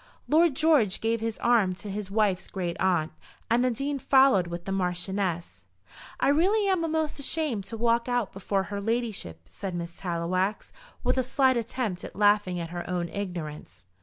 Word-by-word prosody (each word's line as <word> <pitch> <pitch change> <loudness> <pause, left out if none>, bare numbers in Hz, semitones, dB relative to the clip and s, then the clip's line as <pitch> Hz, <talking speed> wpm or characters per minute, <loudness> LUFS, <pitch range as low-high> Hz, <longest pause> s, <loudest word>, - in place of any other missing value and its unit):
Lord 320 -1 +4
George 290 - +3
gave 225 0 0
his 225 -1 -2
arm 220 -6 +3
to 200 - -9
his 200 -1 -5
wife's 200 -3 +1
great 180 -3 -3
aunt, 175 -4 +1 0.4
and 240 +2 +4
the 255 - +3
Dean 275 +4 -2
followed 265 -10 +4
with 170 0 -6
the 195 - -4
Marchioness. 180 - -2 0.5
"I - - +3
really 390 +8 +3
am 375 -3 +2
a'most 315 -2 -1
ashamed 280 -8 0
to 225 +3 -6
walk 235 +1 +2
out 245 -5 0
before 195 0 -1
her 200 +1 -5
ladyship," 220 - -2
said 190 - -6
Miss 170 0 -5
Tallowax, 185 +3 -2 0.3
with - - +1
a - - +4
slight 260 +1 +2
attempt 230 -5 -2
at - - -8
laughing 205 -3 +3
at 165 -1 -5
her 175 0 -4
own 175 -1 -2
ignorance. 170 - -6
205 Hz, 175 wpm, -27 LUFS, 180-250 Hz, 0.5 s, Lord